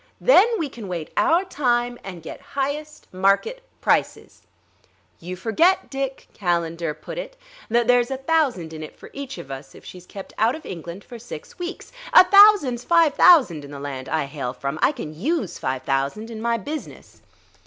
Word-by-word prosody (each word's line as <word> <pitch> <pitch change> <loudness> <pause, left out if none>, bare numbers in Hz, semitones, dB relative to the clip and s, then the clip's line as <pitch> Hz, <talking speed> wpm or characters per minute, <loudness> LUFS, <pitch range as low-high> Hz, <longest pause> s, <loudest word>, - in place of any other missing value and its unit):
Then 455 -4 +6
we 325 -6 -2
can 235 -6 -9
wait 170 -4 -5
our 345 +4 +3
time 245 -7 0
and 180 -4 -9
get - - -9 0.2
highest 295 +3 -3
market 195 - +1 0.2
prices - - 0 0.4
" - - -38
"You 180 +2 -6
forget, 235 - +1
Dick," 270 -1 -4
Calendar 170 -4 -1
put - - -8
it, - - -8 0.3
"that 235 +1 +2
there's 245 -1 +4
a 265 - -3
thousand 265 - 0
in 155 - -7
it 155 - -9
for - - -13
each 280 0 -7
of - - -9
us 135 0 -9
if - - -15
she's 180 -1 -11
kept 195 -1 -10
out 225 +4 +3
of 315 - -11
England 170 +2 -8
for 240 - -11
six 225 - -10
weeks. 355 +1 -6 0.2
A - - +10
thousand's 395 - +6
five 335 -2 +4
thousand 250 - +5
in 140 - -10
the 140 -1 -8
land 135 -2 -6
I 160 -3 0
hail 135 -3 -5
from; 140 +3 -4
I - - +4
can 195 - -7
use 250 - -2
five 130 0 -3
thousand 140 +12 -2
in 220 -1 -7
my 235 0 +1
business." 295 +9 -8
230 Hz, 185 wpm, -23 LUFS, -, 0.4 s, A